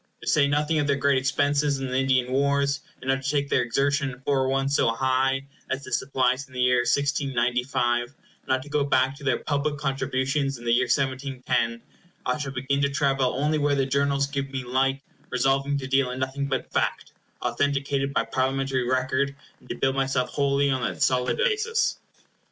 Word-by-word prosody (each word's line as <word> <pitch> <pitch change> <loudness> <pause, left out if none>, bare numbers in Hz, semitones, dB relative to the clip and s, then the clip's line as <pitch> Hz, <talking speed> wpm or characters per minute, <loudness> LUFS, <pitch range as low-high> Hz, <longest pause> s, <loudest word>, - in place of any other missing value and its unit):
To - - -10
say 145 -2 +4
nothing 150 +2 +1
of 145 - 0
their 140 - +3
great 140 -1 +2
expenses 140 +1 +1
in 135 - -3
the 130 0 -3
Indian 130 -1 +1
wars, 140 +1 +1 0.2
and 130 - -5
not 135 0 +1
to 135 - -2
take 140 -1 0
their - - +3
exertion 140 +3 +1
in 125 -1 -9
foreign 135 -1 +1
ones 135 +1 +1
so - - +3
high 130 +3 +1 0.2
as 135 +1 -2
the 130 - -9
supplies 130 +1 0
in 130 - -20
the - - -4
year 125 0 +4
1695—not 125 -1 -1
to 145 - -12
go 145 0 +1
back 135 -1 +2
to 140 - -13
their 130 -3 +2
public 145 0 -1
contributions 135 0 -1
in 120 - -12
the 115 - +2
year 125 +1 +3
1710—I 125 +1 -2
shall 140 -2 -3
begin 135 +2 -1
to 140 - +2
travel 135 -2 +1
only 150 +3 +1
where 145 -1 +2
the 135 -1 +1
journals 140 +1 +1
give 140 -1 -3
me 135 -1 -4
light, 135 +2 0 0.3
resolving 135 +2 +1
to 135 - -5
deal 135 -1 +2
in 125 - -5
nothing 135 +2 -2
but 130 -2 -3
fact, - - -1 0.3
authenticated 140 +2 0
by - - 0
Parliamentary 130 -1 -1
record, 130 +2 0 0.2
and - - -21
to - - -3
build 135 0 0
myself 135 -1 0
wholly 140 0 +1
on 130 -1 0
that - - -1
solid 125 -1 +1
basis. 460 -1 +1
135 Hz, 190 wpm, -25 LUFS, 130-140 Hz, 0.3 s, say